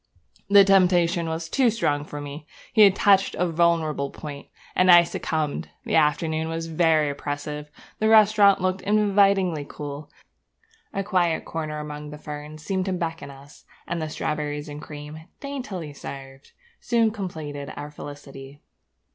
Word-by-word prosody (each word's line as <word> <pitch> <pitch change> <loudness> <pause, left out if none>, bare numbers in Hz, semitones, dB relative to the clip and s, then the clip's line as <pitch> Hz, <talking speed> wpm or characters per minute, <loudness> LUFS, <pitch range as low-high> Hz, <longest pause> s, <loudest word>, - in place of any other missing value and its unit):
The 200 0 +8
temptation 180 -3 +3
was 160 0 -4
too 255 +7 +3
strong 150 -10 -1
for 145 - -7
me; 145 +1 -8 0.3
he 220 - +5
had 200 -2 +7
touched 195 -1 +3
a 180 - +1
vulnerable 160 -4 +1
point; 145 -1 -9 0.3
and 185 0 +3
I 175 -1 +9
succumbed. 155 -3 -3 0.2
The - - -3
afternoon 155 +2 +1
was 165 0 -3
very 160 -2 +2
oppressive; 145 +1 -5 0.3
the 220 - +2
restaurant 210 -3 +6
looked 185 0 0
invitingly 200 -5 +2
cool; 145 0 -7 0.8
a 195 - -2
quiet 180 -5 0
corner 155 -2 -4
among 150 0 -7
the 150 - -8
ferns 150 +1 -8
seemed 190 +3 -1
to 190 - -1
beckon 165 -4 -4
us; 140 +1 -15 0.2
and 170 -1 -3
the 155 - -3
strawberries 150 -1 -3
and 145 0 -8
cream, 150 +2 -9
daintily 210 - -6
served, 135 -1 -10 0.3
soon 230 -2 +2
completed 155 -9 -6
our 145 +1 -7
felicity. 145 -1 -10
160 Hz, 145 wpm, -24 LUFS, 150-190 Hz, 0.8 s, I